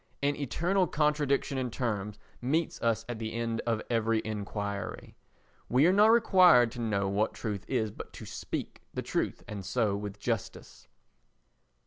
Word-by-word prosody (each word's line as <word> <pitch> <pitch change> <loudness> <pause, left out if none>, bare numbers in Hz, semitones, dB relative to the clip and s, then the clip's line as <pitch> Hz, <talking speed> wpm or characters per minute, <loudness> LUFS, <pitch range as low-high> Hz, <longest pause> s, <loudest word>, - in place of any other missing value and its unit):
An 145 0 +2
eternal 175 +7 +1
contradiction 145 -2 +1
in 125 -1 -1
terms 105 -4 -3 0.2
meets 155 +7 0
us 115 -1 +1
at 120 -2 -5
the 110 -1 -4
end 115 -1 -2
of 115 -2 0
every 115 -1 +1
enquiry. 100 -1 -4 0.5
We 130 +5 +4
are 180 - +5
not 205 +2 +6
required 185 - +6
to 120 -1 -6
know 100 -4 0
what 100 +3 0
truth 105 -4 -4
is, 110 -5 0
but - - -9
to - - -9
speak - - -5
the - - -2
truth, - - -2
and 100 -2 -6
so 105 +1 0
with 105 0 -6
justice. 115 -1 -4
115 Hz, 155 wpm, -30 LUFS, 105-140 Hz, 0.5 s, not